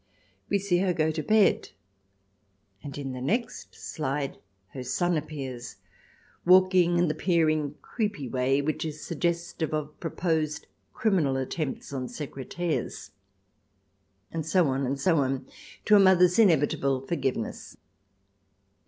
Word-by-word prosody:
We 200 - +3
see 190 -3 +1
her 185 -1 +1
go 160 -2 +1
to 155 0 -3
bed. 210 +6 +3 1.1
And 145 -1 -8
in 135 -2 -4
the 130 -1 -6
next 225 - -2
slide 140 -2 -3 0.3
her 130 - -7
son 150 +8 0
appears, 135 -5 -5 0.7
walking 180 -1 +5
in 175 0 +3
the 150 - 0
peering, 155 -3 +1
creepy 205 - -3
way 130 +3 +1
which 155 +1 -1
is 155 -1 -6
sug 165 - -6
gestive 170 -2 -1
of 150 -1 -4
proposed 160 -3 -1 0.3
criminal 170 -12 +1
attempts 135 +2 -4
on 130 -2 -3
secretaires.... 150 +4 -4 1.2
And 165 -1 -3
so 165 0 +2
on 135 0 0
and 135 +2 -2
so 165 +3 +3
on, 135 -1 -1 0.4
to 210 - +6
a - - +8
mother's 180 0 +5
inevitable 140 - +3
forgiveness. 135 -8 -3
155 Hz, 130 wpm, -27 LUFS, 135-175 Hz, 1.2 s, a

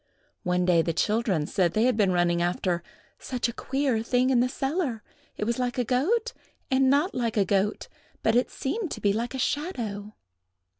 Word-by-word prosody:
One 180 0 0
day 175 -2 +4
the 165 0 -1
children 205 -3 +1
said 180 0 +1
they 215 - +2
had 250 -1 +3
been 205 -3 +3
running 175 -1 +2
after 175 0 0 0.4
"such 250 -2 -2
a 235 - -5
queer 265 -3 -1
thing 250 +3 +2
in 250 - +4
the 250 +1 +2
cellar; 270 - -2 0.3
it - - -2
was 235 +3 -1
like 245 0 -1
a 250 - +2
goat, 360 - +1 0.4
and 260 0 +4
not 295 +8 +2
like 230 -3 -1
a 200 - +4
goat; 200 +1 0 0.4
but 220 - +3
it 245 - +2
seemed 370 +7 -3
to - - -7
be 200 -1 +2
like 235 +4 -3
a - - -2
shadow." 235 - -3
235 Hz, 195 wpm, -26 LUFS, 200-265 Hz, 0.4 s, day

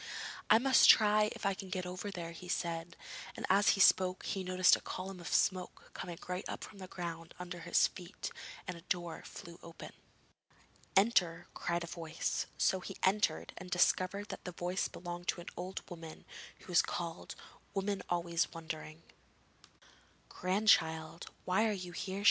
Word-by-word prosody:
'I 215 - +8
must 260 +2 +6
try 215 -1 +7
if - - -7
I 195 - +3
can 190 0 -8
get 185 0 -2
over 185 +3 -5
there,' 170 -4 -5
he 170 +2 -10
said, 170 -1 -2 0.4
and - - -3
as 200 +2 +5
he - - -4
spoke, 185 -1 +5
he 195 - -2
noticed 185 0 +5
a - - -7
column 185 0 -6
of 170 - -8
smoke 185 +3 0
coming 175 -2 -6
right 180 +1 -2
up - - -5
from 200 - -10
the 185 - -7
ground 165 -2 -6
under 180 0 -6
his 170 +1 +4
feet, 180 0 -6 0.4
and 180 - -3
a 170 - -11
door 175 -1 -3
flew 170 0 -10
open. 170 0 -10 1.1
'Enter!' 180 -5 +3
cried 170 0 -1
a - - -3
voice, 165 -1 -3
so 190 - +3
he 195 +1 -7
entered, 205 +3 +2
and 180 0 -9
discovered 185 +3 +2
that - - -6
the 180 - -6
voice 180 +2 -1
belonged 175 0 -7
to - - 0
an 175 - -7
old 185 +2 -5
woman, 165 -3 -9 0.4
who - - -15
was 175 - +7
called 170 -1 -5 0.4
'Woman 195 0 0
always 170 -1 +1
wondering.' 160 -1 -7 1.3
'Grandchild, 165 -4 +2 0.2
why 195 +5 +3
are - - +1
you 180 -3 -5
here?' 190 +3 -4
180 Hz, 170 wpm, -34 LUFS, 170-190 Hz, 1.3 s, I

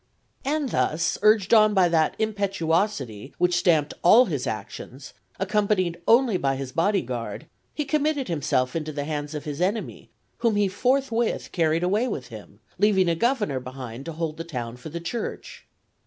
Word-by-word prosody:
And 290 -1 -1
thus, 160 -6 0
urged 215 -1 +4
on 215 -1 +6
by 185 -2 +5
that 160 -2 +2
impetuosity 190 - -1
which 180 0 +2
stamped 160 -4 +2
all 225 +8 +7
his 145 - -3
actions, 115 +5 -7 0.3
accompanied 195 -4 0
only 235 -4 +4
by 135 -4 0
his 135 -1 -5
body 190 +5 +1
guard, 120 +1 -5 0.3
he 300 - -2
committed 295 -1 0
himself 135 -5 0
into 155 -1 -3
the 145 -1 -3
hands 150 0 -4
of 150 - -4
his 150 +1 -5
enemy, 205 +5 -2 0.3
whom 230 -3 +2
he 205 -1 +3
forthwith 240 +3 0
carried 165 -1 +1
away 205 +7 +1
with 135 - -5
him, 105 -2 -12 0.2
leaving 195 -3 +3
a - - +3
governor 210 - 0
behind 130 -1 -8
to 165 - -5
hold 160 -1 -3
the 165 - -4
town 125 -8 -5
for 125 +5 -9
the 170 +3 -5
Church. 220 +8 -6
170 Hz, 170 wpm, -25 LUFS, 145-210 Hz, 0.3 s, all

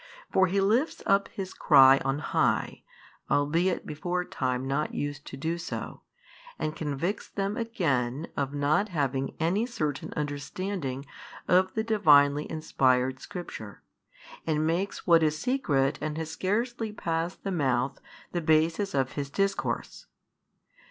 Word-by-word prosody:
For 190 0 +4
He 195 +2 +1
lifts 225 +10 +1
up 195 0 +3
His 190 -2 -6
cry 135 -3 +7
on 135 +1 0
high, 150 - 0 0.5
albeit 165 +6 +1
before 175 +4 -2
time 130 -3 -2
not 145 +3 -1
used 145 0 -4
to 135 - -7
do 165 +4 -2
so, - - -6 0.6
and 155 0 -3
convicts 155 +6 -3
them 200 +1 -2
again 155 - -1
of 140 -2 -1
|519 - - -13
not 150 +9 +2
having 135 -5 -1
any 190 +9 +1
certain 160 - -3
understanding 145 0 -4 0.4
of 185 +1 +3
the 220 - +1
Divinely 150 -9 +4
inspired 130 -5 +1
Scripture, 170 - -8 0.6
and 155 -1 +1
makes 175 +5 -1
what 170 -2 +6
is 155 -1 +2
secret 150 - +1
and 155 0 -3
has 160 -1 -4
scarcely 225 +5 -1
passed 170 -3 -3
the 195 - -2
mouth 130 -6 0 0.3
the 175 - -1
basis 160 +4 +2
of 130 -1 +1
His 140 -1 -4
Discourse. 195 +6 -2
160 Hz, 140 wpm, -28 LUFS, 140-190 Hz, 0.6 s, cry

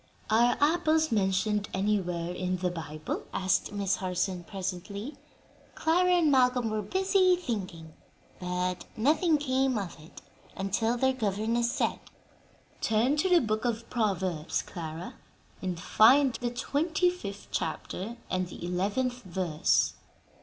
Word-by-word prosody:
"Are 235 +2 +4
apples 315 +1 +3
mentioned 205 0 +1
anywhere 180 -4 0
in 185 0 -2
the 180 0 -1
Bible?" 155 -2 -5
asked 185 -1 +1
Miss 200 -1 0
Harson, 180 -1 -2
presently. 195 - -5 0.6
Clara 360 +3 +3
and 335 -4 +4
Malcolm 250 -3 +3
were 215 0 -1
busy 375 - +3
thinking, 185 - -5 0.5
but 180 0 -2
nothing 305 - +3
came 265 -3 +1
of 190 -6 -5
it, 155 +2 -14 0.3
until 225 +5 0
their 265 +2 +2
governess 230 +1 0
said, - - 0 0.8
"Turn 230 +6 +2
to 375 +5 +2
the 355 -1 +6
book 215 -2 -1
of 230 -2 -2
Proverbs, 190 -8 -1
Clara, 165 0 -7 0.4
and 180 -3 -3
find 255 +8 +5
the 240 0 -2
twenty 310 +8 +1
fifth 205 - -8
chapter 190 +7 -3
and 185 0 -1
the 175 - -8
eleventh 210 +8 -1
verse." 180 -6 +1
215 Hz, 125 wpm, -29 LUFS, 185-260 Hz, 0.8 s, the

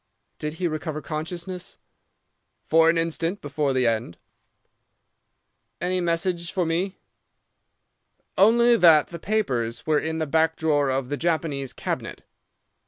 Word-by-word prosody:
"'Did 150 +1 -4
he 175 +1 -1
recover 155 -1 -4
consciousness?' 170 +4 -5 0.9
"'For 165 +1 +5
an 165 - +2
instant 165 +3 -1
before 145 0 -1
the 130 -1 +1
end.' 115 -6 -1 1.6
"'Any 180 +2 -1
message 170 0 -1
for 180 -2 0
me.' 175 +4 -1 1.4
"'Only 235 +4 +5
that 160 -6 +6
the 170 - -8
papers 125 - -1
were 155 -1 +2
in 160 +2 -3
the 160 - -1
back 160 +2 +2
drawer 145 -3 +1
of 130 -1 -1
the 145 - -2
Japanese 155 -6 -1
cabinet. - - -5
160 Hz, 125 wpm, -24 LUFS, 145-175 Hz, 1.6 s, that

